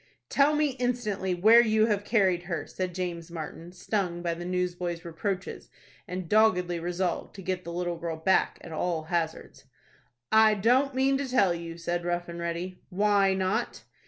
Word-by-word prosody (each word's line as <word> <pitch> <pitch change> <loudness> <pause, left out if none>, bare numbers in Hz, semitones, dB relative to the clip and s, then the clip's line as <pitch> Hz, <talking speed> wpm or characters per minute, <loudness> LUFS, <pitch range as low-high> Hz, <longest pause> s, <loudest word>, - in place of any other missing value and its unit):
"Tell 290 +2 +3
me, 300 -1 +2
instantly, 215 -7 -1
where 220 +6 +7
you 220 -2 +3
have 205 -2 0
carried 190 -5 +2
her," 170 -2 -3
said 185 -2 -4
James 175 -2 -4
Martin, 165 +1 -7
stung 180 -2 -2
by 170 -1 0
the 175 +1 -7
newsboy's 180 -1 -2
reproaches, 180 +3 -4 0.4
and 180 -1 -5
doggedly 180 -4 +3
resolved 175 +1 -2
to 195 - -9
get 185 0 -2
the 170 - -5
little 175 0 -2
girl 165 -1 -4
back, 190 +4 +2
at 170 - -10
all 160 0 -1
hazards. 160 -4 -3 0.7
"I 220 -1 +6
don't 255 +6 +2
mean 270 +1 +2
to 275 -2 -3
tell 200 -8 +3
you," 170 -1 -7
said 175 +1 -2
Rough 175 0 -2
and 170 0 -7
Ready. 170 +2 -4
"Why 200 0 +3
not?" 190 +5 -1
180 Hz, 170 wpm, -28 LUFS, 170-210 Hz, 0.7 s, where